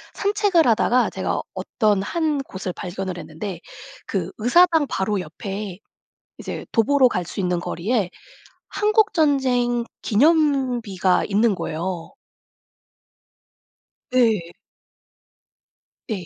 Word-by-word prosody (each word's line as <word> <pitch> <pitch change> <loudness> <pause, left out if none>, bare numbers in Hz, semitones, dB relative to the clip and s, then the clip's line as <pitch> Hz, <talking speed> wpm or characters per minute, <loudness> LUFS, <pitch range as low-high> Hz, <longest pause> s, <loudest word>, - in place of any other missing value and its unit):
산책을 400 - +2
하다가 240 +2 +3
제가 - - -2
어떤 210 -4 0
1 310 +1 -1
곳을 190 -8 -5
발견을 185 0 -5
했는데 165 +3 -7 0.5
그 185 -2 -2
의사당 320 +6 +4
바로 195 +1 -1
옆에 195 +3 -6 0.6
이제 - - -6
도보로 255 +3 +4
갈 180 -5 -2
수 175 - -7
있는 180 -1 0
거리에 190 +3 -1 0.6
한국 430 0 +2
전쟁 250 -6 +2 0.2
기념비가 250 - +2
있는 210 +1 +2
거예요. 170 +1 -4 2.0
네. 220 -9 +2 1.6
네. 195 -5 -4
220 Hz, 195 characters per minute, -22 LUFS, 185-275 Hz, 2.0 s, 의사당